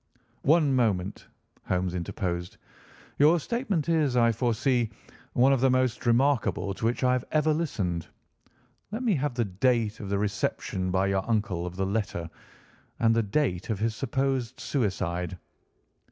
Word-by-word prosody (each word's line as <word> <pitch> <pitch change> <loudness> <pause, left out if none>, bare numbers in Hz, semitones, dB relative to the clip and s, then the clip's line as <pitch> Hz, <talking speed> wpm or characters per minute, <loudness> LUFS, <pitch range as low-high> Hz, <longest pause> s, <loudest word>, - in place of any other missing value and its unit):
"One 150 -1 +4
moment," 105 -6 0 0.4
Holmes 90 -1 0
interposed, 90 -1 -3 0.6
"your 155 +4 +6
statement 210 - -1
is, 155 -6 +2
I 115 -1 +5
foresee, 120 +1 +1 0.4
one 130 +3 +5
of 130 - +1
the 135 - +4
most 130 -1 +1
remarkable 120 -5 +2
to 110 - -4
which 120 +3 0
I 125 0 +4
have 125 -1 -1
ever 155 0 +3
listened. 100 - -2 0.8
Let 225 +4 -3
me 230 -4 +3
have 145 -4 -1
the 120 -2 +1
date 110 +2 +1
of 100 - -6
the 100 - +1
reception 100 -2 -2
by 95 +1 +2
your 95 -1 +1
uncle 95 -6 0
of 90 - -7
the 95 +1 -1
letter, 95 -4 -2 0.7
and 115 -1 +4
the 115 - +3
date 105 -4 -1
of 110 - 0
his 110 +2 -1
supposed 130 -1 -1
suicide." 90 - -2
115 Hz, 155 wpm, -27 LUFS, 95-135 Hz, 0.8 s, your